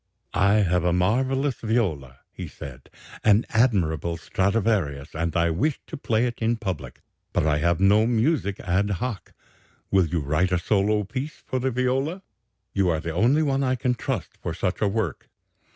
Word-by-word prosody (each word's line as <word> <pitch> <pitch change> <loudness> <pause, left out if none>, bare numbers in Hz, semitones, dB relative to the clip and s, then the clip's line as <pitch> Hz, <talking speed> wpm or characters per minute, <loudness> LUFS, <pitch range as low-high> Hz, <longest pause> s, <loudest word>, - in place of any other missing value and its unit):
'I 100 +2 +3
have 90 -1 +1
a 90 - +2
marvellous 130 +9 +1
viola,' 85 - -1
he - - -7
said, 65 -2 -10 0.3
'an 105 +1 +4
admirable 85 - +1
Stradivarius, 95 -6 0
and 85 0 -2
I 85 0 +2
wish 135 - 0
to - - -7
play 115 -3 0
it 120 -1 -4
in 115 +1 +1
public. 95 - -5 0.3
But - - +1
I 75 -1 +2
have 85 +2 +1
no 105 +3 +4
music 120 - +1
ad 95 +3 0
hoc. 115 -1 -5 0.6
Will 95 -3 +4
you 80 0 -1
write 75 +6 +1
a 90 - +3
solo 105 +3 +1
piece 130 +9 -6
for 130 - -2
the 130 +1 0
viola? 135 +9 -1 0.5
You 95 -2 +2
are 80 -2 +1
the 80 0 -4
only 125 - +3
one 140 -2 +1
I 130 -1 +1
can 125 0 0
trust 125 - -4
for 80 - -4
such 90 +1 -2
a 105 - +3
work.' 100 -6 -2
100 Hz, 175 wpm, -25 LUFS, 85-120 Hz, 0.6 s, an